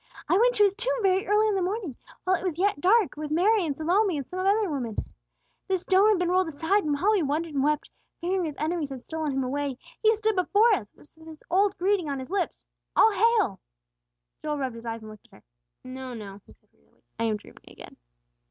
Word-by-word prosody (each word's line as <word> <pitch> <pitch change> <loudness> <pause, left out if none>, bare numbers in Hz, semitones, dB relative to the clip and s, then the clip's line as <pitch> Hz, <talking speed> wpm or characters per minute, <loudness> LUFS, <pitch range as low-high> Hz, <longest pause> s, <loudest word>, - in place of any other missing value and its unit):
"I - - +3
went - - +4
to 415 - +4
His 400 -2 +4
tomb - - -1
very 380 0 +2
early 420 +2 +3
in 425 - +1
the 385 - 0
morning, 370 - -3 0.3
while 375 0 +2
it 365 - -5
was 355 -5 -2
yet 385 -5 +1
dark, 405 +3 +3
with 300 0 -5
Mary 385 +7 +3
and 295 -4 -2
Salome 360 +2 +2
and 275 - -5
some 370 - -6
other 400 +3 +2
women. 255 - -4 0.7
The 380 - +1
stone 380 +3 +3
had 425 - +4
been 355 -1 0
rolled 370 0 +2
aside; 325 +7 0
and 295 -1 0
while 405 +7 +3
we 415 -4 +2
wondered 310 +2 -2
and 275 -1 0
wept, 300 +1 0 0.3
fearing 365 +1 -1
His 300 -3 -5
enemies 315 -1 -2
had 260 -2 -8
stolen 315 -2 -3
Him 270 0 -1
away, 275 0 -2 0.2
He 440 0 +4
stood 435 0 0
before 420 +5 +4
us, 225 - -1
with 320 +2 -17
His 315 -1 -12
old 395 +2 +2
greeting 370 -3 +1
on 280 - -2
His 260 +5 -8
lips, 385 -3 -2 0.3
'All 445 - +6
hail!'" 410 - +2 0.8
Joel 300 -1 -2
rubbed 265 -3 -3
his 230 0 -10
eyes 225 -1 -5
and 215 - -9
looked 215 - -15
at - - -17
her. - - -19 0.4
"No, 255 -1 -7
no!" 200 -2 -9
he - - -16
said - - -34
wearily, 70 0 -34 0.2
"I 230 - +1
am 215 -2 0
dreaming 210 - -17
again!" - - -13
345 Hz, 235 wpm, -26 LUFS, 280-400 Hz, 0.8 s, All